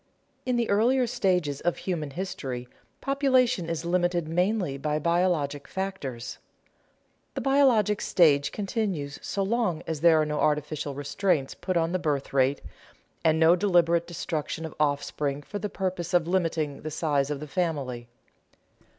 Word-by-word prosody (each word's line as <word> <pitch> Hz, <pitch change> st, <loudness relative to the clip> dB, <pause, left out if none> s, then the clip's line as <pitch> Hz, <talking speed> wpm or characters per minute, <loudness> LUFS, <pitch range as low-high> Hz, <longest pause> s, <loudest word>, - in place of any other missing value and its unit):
In 250 Hz, -, +2 dB
the 235 Hz, -1 st, +1 dB
earlier 245 Hz, +5 st, +3 dB
stages 180 Hz, -, 0 dB
of 175 Hz, -, 0 dB
human 165 Hz, -6 st, -3 dB
history, 135 Hz, -7 st, -5 dB, 0.3 s
population 255 Hz, -, +2 dB
is 165 Hz, 0 st, -3 dB
limited 175 Hz, -1 st, +1 dB
mainly 180 Hz, -1 st, 0 dB
by 150 Hz, +2 st, -1 dB
biologic 165 Hz, -3 st, 0 dB
factors. 190 Hz, -11 st, -5 dB, 1.0 s
The -, -, -2 dB
biologic 255 Hz, -7 st, +3 dB
stage 145 Hz, -5 st, +3 dB
continues 195 Hz, -9 st, -3 dB
so 195 Hz, -, -2 dB
long 205 Hz, -6 st, 0 dB
as 160 Hz, -3 st, -4 dB
there 165 Hz, -2 st, +6 dB
are 155 Hz, -, +2 dB
no 150 Hz, 0 st, -2 dB
artificial 150 Hz, -1 st, 0 dB
restraints 145 Hz, 0 st, 0 dB
put 185 Hz, -1 st, -2 dB
on 165 Hz, 0 st, +1 dB
the 185 Hz, -, 0 dB
birth 145 Hz, -6 st, -2 dB
rate, 135 Hz, +1 st, +2 dB, 0.6 s
and 160 Hz, 0 st, +3 dB
no 165 Hz, +2 st, +6 dB
deliberate 170 Hz, -3 st, +2 dB
destruction 160 Hz, -1 st, -4 dB
of 160 Hz, -, -7 dB
offspring 145 Hz, -1 st, -1 dB
for 205 Hz, +7 st, -6 dB
the 210 Hz, -, -3 dB
purposes 185 Hz, -2 st, -2 dB
of 170 Hz, -2 st, +3 dB
limiting 165 Hz, -5 st, -1 dB
the 155 Hz, -, -4 dB
size 145 Hz, -3 st, 0 dB
of 145 Hz, -2 st, -3 dB
the 150 Hz, -, -7 dB
family. 140 Hz, -8 st, -2 dB
165 Hz, 150 wpm, -27 LUFS, 145-190 Hz, 1.0 s, there